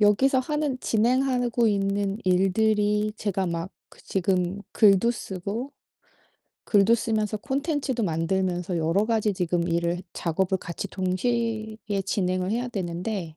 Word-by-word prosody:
여기서 240 +6 +4
하는 295 -1 -1
진행하고 245 +1 +2
있는 200 0 0
일들이 210 +3 +2
제가 195 -3 -1
막 170 +2 -3 0.2
그 - - -17
지금 185 +1 0
글도 205 +2 +5
쓰고 220 +5 -5 0.9
글도 205 +2 +4
쓰면서 215 -2 -1
콘텐츠도 275 -1 -1
만들면서 175 +1 -1
여러가지 205 +7 +1
지금 175 -2 -1
일을 170 +1 0
작업을 185 +3 0
같이 175 +3 -5
동시에 220 +4 -1 0.3
진행을 185 -1 0
해야 240 +3 -1
되는데 180 -4 -4
200 Hz, 275 characters per minute, -25 LUFS, 180-230 Hz, 0.9 s, 글도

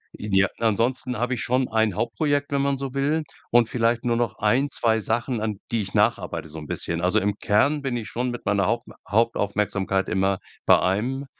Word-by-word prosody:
idea 100 -2 +2
ansonsten 115 +3 0
habe 125 +3 -1
ich 120 - -4
schon 130 +1 +1
ein 110 -3 +1
Hauptprojekt, 145 - -1
wenn 140 -1 +1
man 140 0 +1
so 135 -1 -5
will 145 +3 0 0.3
und 120 -1 +4
vielleicht 115 +1 0
nur 120 -1 +2
noch 120 0 -1
1, 125 +7 +2
2 110 -4 +1
Sachen, 115 +2 -1
an 110 -2 -2
die 115 -2 +1
ich 95 -1 -3
nacharbeite 80 - 0
so 80 +2 -8
'n 75 - -9
bisschen. 85 +3 -1
Also, 90 +5 +2
im 100 0 -1
Kern 140 +8 +2
bin 130 -3 -2
ich 115 - -5
schon 125 +2 -2
mit 120 -1 -6
meiner 100 -2 +2
Haupt 115 +2 -1 0.2
Hauptaufmerksamkeit 100 -3 0
immer 95 -1 +1 0.3
bei - - +7
einem 120 +9 -1
115 Hz, 200 wpm, -24 LUFS, 105-125 Hz, 0.3 s, bei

